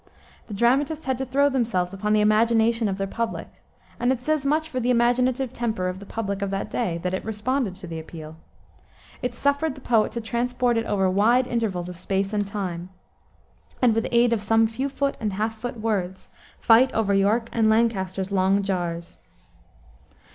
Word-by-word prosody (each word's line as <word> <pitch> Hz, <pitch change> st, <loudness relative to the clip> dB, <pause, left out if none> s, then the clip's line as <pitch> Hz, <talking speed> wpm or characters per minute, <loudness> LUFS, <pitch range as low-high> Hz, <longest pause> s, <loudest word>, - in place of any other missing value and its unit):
The 210 Hz, -, -6 dB
dramatists 275 Hz, +8 st, +1 dB
had 260 Hz, -1 st, -1 dB
to 265 Hz, -, -3 dB
throw 280 Hz, +3 st, +3 dB
themselves 225 Hz, -9 st, 0 dB
upon 210 Hz, +2 st, -1 dB
the 215 Hz, -, +4 dB
imagination 225 Hz, +1 st, +3 dB
of 190 Hz, -, -2 dB
their 195 Hz, -, -1 dB
public, 230 Hz, +3 st, -3 dB, 0.5 s
and 245 Hz, +1 st, +2 dB
it 260 Hz, -, 0 dB
says 295 Hz, +1 st, -1 dB
much 310 Hz, +2 st, +1 dB
for 265 Hz, -5 st, -3 dB
the 245 Hz, 0 st, -1 dB
imaginative 250 Hz, +1 st, +2 dB
temper 220 Hz, -7 st, -2 dB
of 185 Hz, +1 st, -4 dB
the 200 Hz, -, -11 dB
public 200 Hz, -3 st, -3 dB
of 200 Hz, -, -1 dB
that 195 Hz, +2 st, -3 dB
day, 200 Hz, -9 st, -1 dB
that 180 Hz, 0 st, -1 dB
it 190 Hz, -, -2 dB
responded 220 Hz, 0 st, -2 dB
to 190 Hz, 0 st, -10 dB
the 165 Hz, -2 st, -6 dB
appeal. 160 Hz, -1 st, -9 dB, 0.9 s
It 250 Hz, -1 st, -3 dB
suffered 285 Hz, +3 st, 0 dB
the -, -, -11 dB
poet 230 Hz, -4 st, +2 dB
to 235 Hz, -, -2 dB
transport 240 Hz, +2 st, 0 dB
it 230 Hz, 0 st, -1 dB
over 195 Hz, -2 st, +1 dB
wide 220 Hz, +7 st, +3 dB
intervals 220 Hz, -8 st, -2 dB
of 180 Hz, -1 st, -8 dB
space 195 Hz, +2 st, -2 dB
and 205 Hz, -1 st, 0 dB
time, 185 Hz, -4 st, -4 dB, 0.9 s
and 245 Hz, -3 st, +4 dB
"with 225 Hz, +1 st, 0 dB
aid 240 Hz, 0 st, +4 dB
of 220 Hz, -, 0 dB
some 225 Hz, +2 st, +3 dB
few 255 Hz, +5 st, -2 dB
foot 280 Hz, 0 st, -1 dB
and 210 Hz, -3 st, -2 dB
half 215 Hz, +3 st, -1 dB
foot 240 Hz, +2 st, -6 dB
words, 190 Hz, -4 st, -3 dB, 0.3 s
fight 240 Hz, +3 st, +5 dB
over 210 Hz, -3 st, +1 dB
York 210 Hz, +4 st, +2 dB
and 225 Hz, -2 st, +2 dB
Lancaster's 195 Hz, -4 st, 0 dB
long 195 Hz, +1 st, +2 dB
jars." 175 Hz, -3 st, -3 dB
225 Hz, 190 wpm, -24 LUFS, 195-245 Hz, 0.9 s, fight